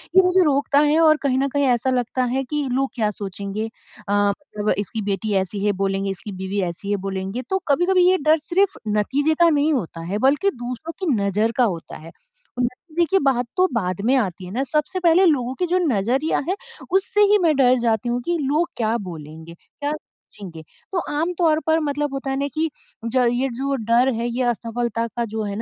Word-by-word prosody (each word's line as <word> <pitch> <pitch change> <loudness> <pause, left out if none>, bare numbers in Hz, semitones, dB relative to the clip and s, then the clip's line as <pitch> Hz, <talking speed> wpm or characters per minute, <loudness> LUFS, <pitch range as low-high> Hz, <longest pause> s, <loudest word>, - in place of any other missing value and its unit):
ये 380 - +9
मुझे 365 0 +4
रोकता 285 0 +2
है 300 +2 +3
और 310 -1 +5
कहीं 260 -2 +1
न 275 - +1
कहीं 285 +1 +1
ऐसा 250 0 +2
लगता 255 0 0
है 260 +2 -1
कि 295 +2 -2
लोग 270 +1 0
क्या 215 -3 +1
सोचेंगे? 200 +2 -5 0.4
अ, - - +1
मतलब 205 +1 -1
इसकी 210 +2 -3
बेटी 205 +1 -2
ऐसी 195 +2 -1
है 205 - +3
बोलेंगे, 195 0 0
इसकी 200 +3 -7
बीवी 190 +1 -3
ऐसी 200 +4 -6
है 205 - +1
बोलेंगे। 195 +5 -3
तो 380 0 +1
कभी-कभी 355 +5 +3
ये 375 - +4
डर 310 +2 +4
सिर्फ़ 375 +6 0 0.2
नतीजे 285 +9 +1
का 340 -1 +6
नहीं 300 0 +2
होता 170 - -3
है 205 - 0
बल्कि 375 +8 +2
दूसरों 250 +7 -6
की 340 -8 +1
नज़र 205 +3 +1
का 250 - +4
होता 175 -7 -3
है। 165 +2 -12 0.5
नतीजे 310 +8 -1
की 385 - +5
बात 250 -3 +2
तो 370 +1 +5
बाद 185 -4 -1
में 260 +3 +4
आती 185 -5 -2
है 180 - -9
न - - +2
सबसे 305 +6 -1
पहले 350 +2 +5
लोगों 260 -6 +2
की 360 - +2
जो 360 +2 +2
नज़रिया 250 +7 +1
है 380 - +1 0.4
उससे 390 +2 +2
ही 420 - +6
मैं 315 -3 +3
डर 255 -1 +4
जाती 230 0 0
हूँ 245 +1 -1
कि 345 -1 0
लोग 300 +5 +1
क्या 225 0 0
बोलेंगे? 160 -3 -9
क्या 290 - -6
सोचेंगे? 190 - -12 0.3
तो 365 - 0 0.2
आम 345 +3 0
तौर 320 -3 +3
पर 320 +1 +3
मतलब 290 -1 -2
होता 270 0 -4
है 270 - -1
न - - -3
कि 320 +1 0 0.4
ज 250 +2 +2
ये 260 +2 0
जो 275 +1 -1
डर 235 +2 +2
है, 230 +1 -2
ये 250 +2 -1
असफलता 235 -1 -1
का 235 +1 -3
जो 220 0 -4
है 200 -1 -4
250 Hz, 215 wpm, -22 LUFS, 205-305 Hz, 0.5 s, ये